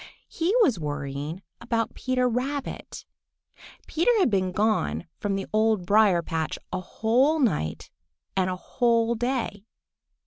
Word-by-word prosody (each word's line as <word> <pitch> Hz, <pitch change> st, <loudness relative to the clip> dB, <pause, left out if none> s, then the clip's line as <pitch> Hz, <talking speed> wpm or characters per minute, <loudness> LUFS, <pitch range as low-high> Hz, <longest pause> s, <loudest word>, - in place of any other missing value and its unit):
He 345 Hz, +6 st, 0 dB
was 250 Hz, -, +2 dB
worrying 145 Hz, +3 st, -4 dB, 0.2 s
about 230 Hz, -1 st, -1 dB
Peter 255 Hz, -1 st, 0 dB
Rabbit. 260 Hz, +4 st, -3 dB, 0.8 s
Peter 335 Hz, +9 st, +1 dB
had 370 Hz, -, +3 dB
been 185 Hz, -2 st, +1 dB
gone 180 Hz, -, 0 dB
from 200 Hz, -1 st, -1 dB
the 195 Hz, -, -3 dB
Old 215 Hz, -3 st, +2 dB
Briar 200 Hz, -3 st, +4 dB
patch 160 Hz, -2 st, -2 dB, 0.2 s
a 185 Hz, -, 0 dB
whole 245 Hz, -, +2 dB
night 210 Hz, -, -1 dB, 0.4 s
and 185 Hz, -1 st, +2 dB
a 185 Hz, -, -2 dB
whole 230 Hz, +3 st, +1 dB
day. 235 Hz, -4 st, -2 dB
215 Hz, 130 wpm, -26 LUFS, 180-250 Hz, 0.8 s, Briar